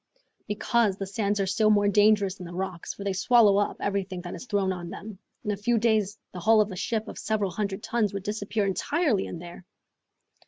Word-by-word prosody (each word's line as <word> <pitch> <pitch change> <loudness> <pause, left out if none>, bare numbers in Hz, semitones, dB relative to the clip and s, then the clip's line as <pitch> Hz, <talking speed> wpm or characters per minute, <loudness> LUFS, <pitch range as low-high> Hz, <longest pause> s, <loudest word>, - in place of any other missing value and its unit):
"Because 210 -1 +1
the 195 - -3
sands 205 +1 -1
are 195 - +2
still 215 +3 +2
more 205 -1 +4
dangerous 205 -1 +4
than 185 -3 -9
the 175 - -9
rocks, 185 -2 -4
for 200 - -7
they 200 -1 -1
swallow 210 +1 +5
up 205 - -1
everything 195 -2 -2
that 175 -1 -7
is 255 - -8
thrown 200 -4 +1
on 175 -2 -7
them. 200 0 -9 0.2
In 210 - -1
a - - 0
few 230 +4 +1
days 215 -2 +1
the 180 - -7
hull 220 +4 +4
of 210 -1 +2
a - - -5
ship 220 +3 -2
of - - -8
several 210 -3 -1
hundred 200 +2 -3
tons 225 -4 0
would 195 -1 -5
disappear 210 0 -2
entirely 225 - 0
in - - -6
there!" 175 +2 -10
205 Hz, 220 wpm, -27 LUFS, 190-215 Hz, 0.2 s, swallow